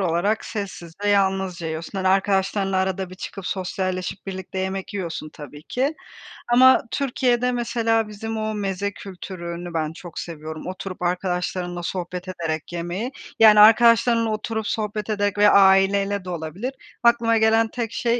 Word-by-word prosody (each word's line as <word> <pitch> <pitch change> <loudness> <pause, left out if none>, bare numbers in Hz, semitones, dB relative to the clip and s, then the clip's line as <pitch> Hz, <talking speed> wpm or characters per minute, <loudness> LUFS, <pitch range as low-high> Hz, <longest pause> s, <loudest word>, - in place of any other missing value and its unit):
olarak 190 +4 0
sessiz 190 -5 -6
ve - - +2
yalnızca 190 -3 +1
yiyorsun, 160 +5 -5
hani, 185 - +1
arkadaşlarınla 195 0 +1
arada 190 0 -1
bir - - -9
çıkıp 195 0 -7
sosyalleşip 185 0 -3
birlikte 190 0 -6
yemek 190 +1 -3
yiyorsun 165 -5 -4
tabii 145 0 -11
ki 270 - -1 0.6
ama 260 +2 +7
Türkiye'de 250 -2 +1
mesela 230 -2 0
bizim 220 +1 -5
o 215 0 -2
meze 200 0 -2
kültürünü 175 -3 -7
ben 160 -1 -1
çok 175 0 -9
seviyorum. 155 0 -7
Oturup 185 0 -6
arkadaşlarımla 180 0 -2
sohbet 180 +1 -4
ederek 165 -3 -4
yemeyi, 175 +9 -3 0.3
yani 215 -1 +8
arkadaşlarınla 230 +1 +6
oturup 220 0 -3
sohbet 210 0 -3
ederek 205 -1 0
ve 205 0 +6
aileyle 195 0 +4
de - - -6
olabilir. 180 - -4 0.3
Aklıma 235 -1 +4
gelen 225 +1 +4
tek 235 -3 -3
şey, 240 0 0
195 Hz, 145 wpm, -23 LUFS, 180-220 Hz, 0.6 s, yani